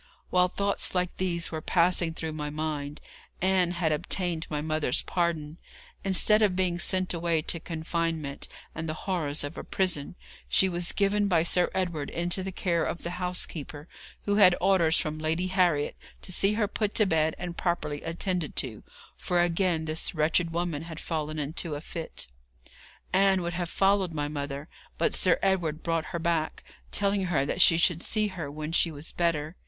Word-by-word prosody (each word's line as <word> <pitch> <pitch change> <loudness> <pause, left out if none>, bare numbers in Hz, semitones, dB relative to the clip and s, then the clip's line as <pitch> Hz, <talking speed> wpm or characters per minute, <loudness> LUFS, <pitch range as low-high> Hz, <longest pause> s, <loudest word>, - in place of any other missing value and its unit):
While 180 0 +4
thoughts 200 +1 +1
like 180 -1 0
these 170 -3 -1
were 160 -1 -4
passing 170 -1 +3
through 160 -1 -4
my 150 -1 -4
mind, 150 -1 -4 0.4
Ann 185 -1 +3
had 170 -2 0
obtained 170 +1 0
my 150 - -2
mother's 155 -3 0
pardon. 165 -3 -1 0.4
Instead 200 +3 +5
of 200 -4 +3
being 180 -2 0
sent 185 +1 0
away 170 -2 0
to 165 - 0
confinement 160 -3 -3 0.3
and 160 0 -4
the 155 - -2
horrors 160 -7 0
of 145 +4 -5
a - - -6
prison, 180 -5 0 0.3
she 190 - +4
was 175 -1 -1
given 205 0 +2
by 170 -4 +3
Sir 175 +1 +2
Edward 170 -6 -1
into 175 +2 -1
the 190 +1 -4
care 175 -2 0
of 170 - -3
the 175 +1 -5
housekeeper, 160 -4 -4 0.4
who 205 0 +1
had 185 -4 +7
orders 175 -3 +4
from 155 0 -1
Lady 160 +3 0
Harriet 180 -6 +2 0.3
to - - -6
see 195 +3 +3
her 210 -1 +1
put 210 0 -2
to 215 - +5
bed 160 -4 +1
and 175 -1 -5
properly 170 -5 -2
attended 175 0 -2
to, 115 -5 -1 0.3
for 180 - -1
again 175 -1 +1
this 160 +2 -1
wretched 160 +2 +2
woman 170 -3 -2
had 165 -1 -7
fallen 155 -2 -3
into 150 +2 -2
a - - -4
fit. 165 +1 -6 0.9
Ann 190 -1 +4
would 170 0 -3
have 175 -1 -3
followed 195 -2 +2
my 145 -1 -1
mother, 145 0 -5 0.3
but - - +1
Sir 180 -3 +3
Edward 175 -5 +1
brought 165 -2 0
her 170 - -4
back, 165 -2 -1 0.3
telling 200 -1 +1
her 155 -6 +1
that 170 - -1
she 165 - +7
should 170 -1 +2
see 215 +1 0
her 170 -7 -5
when 155 +2 -5
she 170 0 +3
was 150 +1 -7
better. 165 -2 0
170 Hz, 180 wpm, -28 LUFS, 155-185 Hz, 0.9 s, had